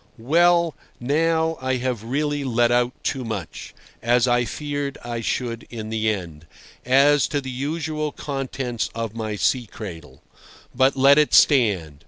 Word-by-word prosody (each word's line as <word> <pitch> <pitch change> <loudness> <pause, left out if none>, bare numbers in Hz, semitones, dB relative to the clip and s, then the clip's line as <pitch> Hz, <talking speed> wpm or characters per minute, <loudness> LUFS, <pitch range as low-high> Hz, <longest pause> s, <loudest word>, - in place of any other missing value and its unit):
Well, 170 +6 +3 0.2
now, 160 +4 +1
I 130 0 0
have 125 -3 -3
really 145 +4 -1
let 120 -2 +2
out 120 +1 +2
too 130 - -2
much 105 -8 -6 0.3
(as 120 +1 +3
I 120 0 +2
feared 145 0 -4
I 120 -1 -4
should 115 0 -3
in 110 -2 -7
the 110 0 0
end) 85 -7 -5 0.4
as 140 +2 +4
to 145 - -1
the 130 -1 -6
usual 150 +3 -3
contents 135 -5 -4
of 115 -2 -4
my 110 -2 -4
sea 120 +3 0
cradle. 80 - -10 0.5
But 130 +2 +3
let 140 +2 +6
it 150 - +3
stand. 100 - +3
125 Hz, 150 wpm, -22 LUFS, 115-145 Hz, 0.5 s, let